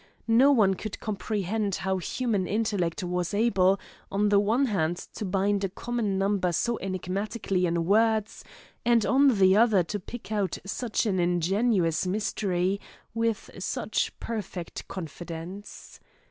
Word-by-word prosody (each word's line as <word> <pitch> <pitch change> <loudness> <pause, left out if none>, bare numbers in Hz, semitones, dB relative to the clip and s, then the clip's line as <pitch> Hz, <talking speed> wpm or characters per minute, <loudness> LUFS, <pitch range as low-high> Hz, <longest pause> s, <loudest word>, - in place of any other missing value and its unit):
No 245 +5 +6
one 210 -8 +4
could 210 +2 -6
comprehend 205 -1 -2
how 190 +3 -1
human 205 0 -1
intellect 205 -6 -1
was 180 +2 -2
able 195 -3 +3 0.3
on 205 +1 +2
the 205 -1 +5
one 225 +7 +2
hand 175 -7 0 0.2
to - - -5
bind 200 +1 +1
a 195 - 0
common 215 -1 -2
number 195 -2 +1
so 235 +7 0
enigmatically 190 +1 -2
in 170 0 0
words, 220 +2 +2 0.4
and 235 -2 +3
on 270 -3 +4
the 190 0 +5
other 215 -4 +5
to 205 +5 -4
pick 220 +2 -9
out 200 -5 0
such 230 +4 -1
an 195 -4 +1
ingenious 180 +1 +1
mystery 195 -1 -1 0.3
with 230 -1 -1
such - - -2
perfect 195 -6 -5
confidence. 175 +3 -8
200 Hz, 135 wpm, -27 LUFS, 185-220 Hz, 0.4 s, No